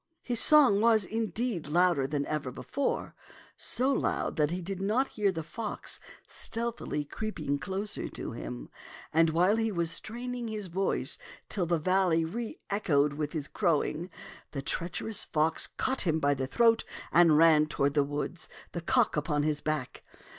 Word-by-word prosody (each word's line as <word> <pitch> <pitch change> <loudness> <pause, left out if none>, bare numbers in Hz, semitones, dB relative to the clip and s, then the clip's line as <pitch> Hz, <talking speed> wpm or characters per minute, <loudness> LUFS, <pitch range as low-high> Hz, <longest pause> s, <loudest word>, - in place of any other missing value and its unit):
His 240 -2 +1
song 270 -10 +6
was, 225 -3 +4
indeed, 220 - -2
louder 170 -3 +3
than 140 0 -1
ever 150 -3 -2
before, 265 - -3 0.4
so 260 +3 -1
loud - - 0
that 150 -1 +2
he 175 +2 -2
did 190 +1 -5
not 230 +7 +1
hear 205 -3 +1
the 165 -3 -4
fox 210 +7 -4 0.3
stealthily 230 -10 -3
creeping 155 -7 -3
closer 195 +5 -3
to - - -5
him. - - -7 0.4
And 165 +1 +5
while 180 +7 +3
he 225 -1 0
was 170 -3 -1
straining 240 +6 -5
his 210 -4 -4
voice 190 +3 -1 0.3
till 180 -4 -1
the 170 0 +2
valley 180 -1 +2
reechoed 185 -7 -1
with 150 0 -3
his 150 -3 -3
crowing, 165 +2 0 0.4
the 135 -2 -4
treacherous 180 +8 -2
fox 155 +1 +1
caught 260 0 0
him 160 -4 +2
by 145 -1 +3
the 135 -1 -3
throat 230 - +4 0.3
and 165 -3 +6
ran 155 -1 +6
toward 140 -2 0
the 145 -1 +3
woods, 145 +4 -4 0.2
the 170 - -4
cock - - +2
upon 150 -1 0
his 150 0 0
back. 155 -4 -3
170 Hz, 160 wpm, -29 LUFS, 150-215 Hz, 0.4 s, song